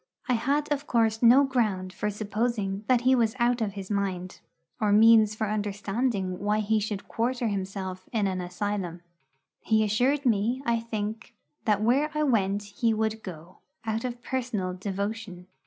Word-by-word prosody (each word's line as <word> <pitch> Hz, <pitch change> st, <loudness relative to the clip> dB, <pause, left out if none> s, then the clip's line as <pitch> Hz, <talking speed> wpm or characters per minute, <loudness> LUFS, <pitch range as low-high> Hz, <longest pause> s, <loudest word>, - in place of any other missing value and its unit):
I 250 Hz, -, +2 dB
had 285 Hz, +6 st, 0 dB
of 290 Hz, 0 st, -1 dB
course 225 Hz, -2 st, +2 dB
no 250 Hz, +4 st, +7 dB
ground 210 Hz, -9 st, 0 dB
for 210 Hz, -, -2 dB
supposing 210 Hz, -1 st, -2 dB
that 250 Hz, -2 st, +4 dB
he 255 Hz, +1 st, +4 dB
was 230 Hz, -3 st, +2 dB
out 240 Hz, 0 st, +2 dB
of 205 Hz, -3 st, -1 dB
his 195 Hz, 0 st, -7 dB
mind, 185 Hz, -2 st, -2 dB, 0.4 s
or 210 Hz, -3 st, +2 dB
means 215 Hz, 0 st, +6 dB
for 220 Hz, 0 st, -1 dB
understanding 205 Hz, -1 st, -2 dB
why 210 Hz, +2 st, +1 dB
he 215 Hz, +1 st, +1 dB
should 205 Hz, -1 st, -4 dB
quarter 240 Hz, 0 st, -1 dB
himself 190 Hz, -1 st, -4 dB
in 220 Hz, -4 st, +1 dB
an 185 Hz, -1 st, -1 dB
asylum. 180 Hz, -1 st, -3 dB, 0.6 s
He 220 Hz, -1 st, +2 dB
assured 250 Hz, +7 st, +1 dB
me, 230 Hz, +2 st, +2 dB
I 235 Hz, -1 st, +2 dB
think, 225 Hz, +1 st, -5 dB, 0.3 s
that 210 Hz, -2 st, +2 dB
where 270 Hz, +7 st, +3 dB
I 305 Hz, -, +1 dB
went 205 Hz, -7 st, +1 dB
he 215 Hz, +3 st, 0 dB
would 220 Hz, 0 st, -1 dB
go, 175 Hz, -2 st, -10 dB, 0.3 s
out 220 Hz, 0 st, -1 dB
of 245 Hz, -1 st, -5 dB
personal 230 Hz, -8 st, -2 dB
devotion. 200 Hz, 0 st, -4 dB
215 Hz, 165 wpm, -27 LUFS, 200-235 Hz, 0.6 s, no